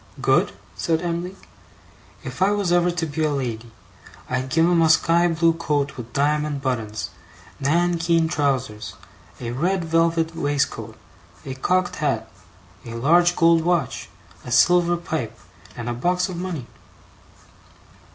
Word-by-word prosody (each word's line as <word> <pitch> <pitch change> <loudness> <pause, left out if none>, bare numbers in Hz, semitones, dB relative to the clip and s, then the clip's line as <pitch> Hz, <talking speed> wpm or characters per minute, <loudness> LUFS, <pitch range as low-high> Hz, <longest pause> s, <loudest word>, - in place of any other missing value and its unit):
'Good?' - - +2 0.2
said 165 0 0
Em'ly. 175 +2 -3 0.9
'If - - -8
I 190 - +5
was 200 -4 0
ever 175 0 +3
to 175 -1 -2
be 155 +1 -3
a 155 - +2
lady, 120 -5 -3 0.6
I'd 130 +1 -2
give 165 +4 +3
him 170 -1 +3
a 160 - +4
sky 170 +2 +4
blue 165 0 +2
coat 145 -4 -1
with 120 -1 -8
diamond 150 0 0
buttons, 110 -5 -3 0.5
nankeen 170 +2 +2
trousers, 135 -9 -1 0.4
a 120 -1 -4
red 175 +7 0
velvet 165 0 +1
waistcoat, 145 -3 -2 0.5
a 135 - -4
cocked 180 +7 0
hat, 130 -7 -1 0.6
a 115 -1 -8
large 175 +8 +4
gold 165 -1 +4
watch, 175 -1 -1 0.3
a 125 - -8
silver 175 +5 +4
pipe, 150 -10 -4 0.4
and 120 -1 -5
a 120 - -1
box 180 +9 0
of 185 - -5
money. 175 -8 -4
160 Hz, 140 wpm, -23 LUFS, 135-175 Hz, 0.9 s, I